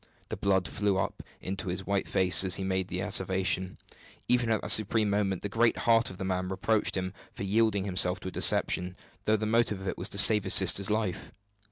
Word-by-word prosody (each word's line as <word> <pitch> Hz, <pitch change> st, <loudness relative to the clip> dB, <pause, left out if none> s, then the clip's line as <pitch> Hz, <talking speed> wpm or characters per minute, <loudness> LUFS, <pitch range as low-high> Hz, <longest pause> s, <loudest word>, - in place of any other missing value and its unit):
The -, -, -4 dB
blood 95 Hz, -3 st, 0 dB
flew 100 Hz, +7 st, -1 dB
up 95 Hz, -, -3 dB, 0.2 s
into 95 Hz, +2 st, -5 dB
his 90 Hz, +2 st, -5 dB
white 100 Hz, 0 st, -2 dB
face 95 Hz, 0 st, +3 dB
as 95 Hz, -1 st, 0 dB
he 95 Hz, -, -5 dB
made 95 Hz, -1 st, -2 dB
the 90 Hz, -1 st, -5 dB
asseveration. 95 Hz, -2 st, 0 dB, 0.5 s
Even 120 Hz, -1 st, +1 dB
at 110 Hz, -2 st, -1 dB
that 105 Hz, -, +1 dB
supreme 105 Hz, 0 st, +2 dB
moment 100 Hz, -2 st, -2 dB
the -, -, -2 dB
great 115 Hz, +3 st, +1 dB
heart 115 Hz, -1 st, +2 dB
of 95 Hz, -, -10 dB
the 95 Hz, -, -5 dB
man 90 Hz, -1 st, -3 dB
reproached 105 Hz, +2 st, -1 dB
him 95 Hz, 0 st, -4 dB, 0.2 s
for -, -, -8 dB
yielding 105 Hz, 0 st, 0 dB
himself 90 Hz, -1 st, 0 dB
to 95 Hz, -, -6 dB
a -, -, -12 dB
deception, 90 Hz, +1 st, +2 dB, 0.3 s
though 110 Hz, 0 st, +2 dB
the 110 Hz, -, -4 dB
motive 110 Hz, -2 st, 0 dB
of 95 Hz, -, -8 dB
it -, -, -4 dB
was 90 Hz, -, -5 dB
to -, -, -6 dB
save 105 Hz, +1 st, +6 dB
his 95 Hz, -, +3 dB
sister's 95 Hz, +1 st, +4 dB
life. 105 Hz, -4 st, -3 dB
95 Hz, 220 wpm, -28 LUFS, 95-105 Hz, 0.5 s, save